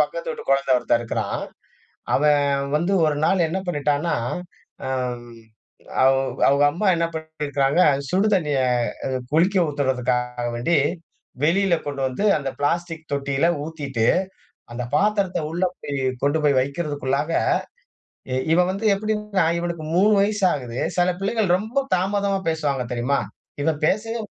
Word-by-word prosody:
பக்கத்து - - -4
வீட்டு 465 -1 -7
குழந்தை 135 -1 +2
ஒருத்தன் 120 - +1
இருக்கிறான். 120 - -3 0.7
அவன் 140 -1 +2
வந்து 170 +5 0
ஒரு 150 -1 +1
நாள் 180 -2 +3
என்ன 165 +4 -2
பண்ணிட்டான்னா, 150 0 0 0.7
அம். 125 -2 -3 0.7
அவ் 135 -1 +2
அவுங்க 140 +1 +4
அம்மா 185 +6 -1
என்ன 170 - +1
பண்ணிட்டு 160 -1 -8
போயிருக்காங்க, 145 +3 +2 0.3
சுடு 195 +4 +2
தண்ணீய 150 -8 +1 0.5
அ - - -3 0.2
குளிக்க 180 +5 +3
ஊத்துறதுக்காக 125 -3 -1
வேண்டி 140 +8 +1 0.7
வெளியில 180 +3 +3
கொண்டு 140 -2 -4
வந்து, 130 +10 -4
அந்த 140 -2 -3
பிளாஸ்டிக் 165 +2 -2
தொட்டியில 140 +2 +1 0.2
ஊத்திட்டு, 140 -7 -2 0.7
அந்த 120 +1 -4
பாத்திரத்த 200 0 +1
உள்ள 175 +3 -1 0.2
போயி 140 -1 -3 0.2
கொண்டு 145 +3 +2
போய் 140 -3 +4
வைக்கிறதுக்குள்ளாக, 140 0 -2 1.0
இ - - 0 0.2
இவன் 180 +2 +3
வந்து 200 +4 -4
எப்பிடின்னா, 210 -3 -1
இவனுக்கு 170 -2 -4
3 205 +4 +5
வயசு 205 0 0
ஆகுது. 125 -3 -5 0.2
சில 180 0 +3
பிள்ளைகள் 200 -2 +1
ரொம்ப 235 +8 -2
தாமதமா 195 +1 0
பேசுவாங்க 145 -5 -1
தெரியுமா? 125 +4 0 0.4
இவன் 155 -1 0
பேசவே 225 +3 -1
155 Hz, 135 wpm, -22 LUFS, 135-185 Hz, 1.0 s, 3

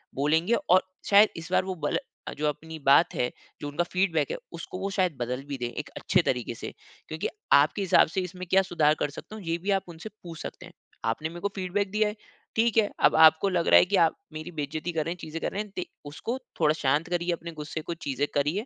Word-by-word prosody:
बोलेंगे 160 - +2 0.2
और 185 +1 +6 0.3
शायद 205 +1 +7
इस 170 +2 -8
बार - - +3
वो 190 -1 -3
बल - - +1 0.4
जो 150 0 0
अपनी 160 +2 -4
बात 140 +5 +6
है, 125 - 0 0.3
जो 145 - -4
उनका 145 +4 0
फ़ीडबैक 175 -5 0
है, - - -2 0.2
उसको 170 +2 -7
वो 195 +1 -2
शायद 185 -5 +1
बदल 125 +2 -3
भी 140 - -4
दें, 125 - -3
एक 150 - -5
अच्छे 185 -2 +2
तरीक़े 125 -2 -1
से - - -6 0.4
क्योंकि 160 0 -3 0.3
आपके 150 +8 +5
हिसाब 190 -2 +5
से 185 +4 -2
इसमें 180 0 -6
क्या 190 0 +5
सुधार 165 -5 +2
कर 145 - 0
सकता 215 +8 -10
हूँ 215 - -9
ये 165 0 -1
भी 200 - 0
आप 195 -1 +2
उनसे 170 +6 -8
पूछ 165 -2 -8
सकते - - -8
हैं। - - -14 0.3
आपने 135 +8 -1
मेरे 170 +1 -9
को 200 - +1
फ़ीडबैक 195 +1 -1
दिया 215 +1 +2
है, 210 - -7 0.4
ठीक 230 0 +2
है, 210 -2 +4
अब - - +5
आपको 160 +4 +6
लग 175 -2 0
रहा - - +8
है - - +4
कि 200 - 0
आप 170 -3 +4 0.2
मेरी 155 +3 -6
बेइज़्ज़ती 155 +2 -3
कर 155 -2 -1
रहे 170 - -2
हैं, - - -14
चीज़ें 160 +1 -6
कर - - -1
रहे 200 - -2
है, 210 - -14
ते 180 - -3 0.2
उसको 195 - -4 0.2
थोड़ा 155 -1 +4
शांत 150 +3 0
करिए 175 0 0
अपने 170 0 -6
गुस्से 155 0 -6
को 170 - -4
चीज़ें 145 -3 -2
करिए 150 +10 +1
170 Hz, 245 wpm, -27 LUFS, 150-185 Hz, 0.4 s, रहा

